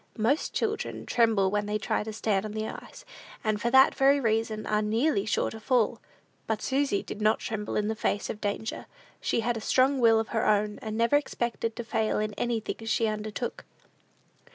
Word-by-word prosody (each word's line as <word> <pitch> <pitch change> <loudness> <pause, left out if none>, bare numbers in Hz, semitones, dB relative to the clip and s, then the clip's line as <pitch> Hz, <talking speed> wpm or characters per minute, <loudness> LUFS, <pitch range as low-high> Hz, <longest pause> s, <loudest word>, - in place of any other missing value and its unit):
Most 235 +8 +1
children 435 -1 -2
tremble 220 -5 +2
when 205 0 -1
they 210 0 0
try 210 - -1
to 220 - -5
stand 210 -2 0
on 215 -1 -5
the 215 0 -3
ice, - - -10 0.4
and 215 -1 0
for 235 - +1
that 265 +2 +6
very 275 +1 +4
reason 220 -2 0
are 210 0 +1
nearly 220 +1 +1
sure - - 0
to 220 - -8
fall; 240 0 +1 0.5
but 220 -1 0
Susy 270 -4 0
did 215 - -7
not 215 +1 +3
tremble 210 -2 -4
in 210 - +1
the 220 - 0
face 205 -1 -1
of 210 - -6
danger: 210 +2 -3 0.3
she - - 0
had 235 +1 0
a - - -5
strong 265 +4 +3
will 225 -2 +5
of 225 - -3
her 225 - 0
own, 210 +1 +1
and 220 -3 -4
never 235 +5 +4
expected 235 -5 -2
to 235 - -4
fail 225 -1 0
in 215 0 -1
anything 225 +1 -3
she 225 +1 +2
undertook. 215 +2 -3
220 Hz, 200 wpm, -28 LUFS, 215-240 Hz, 0.5 s, that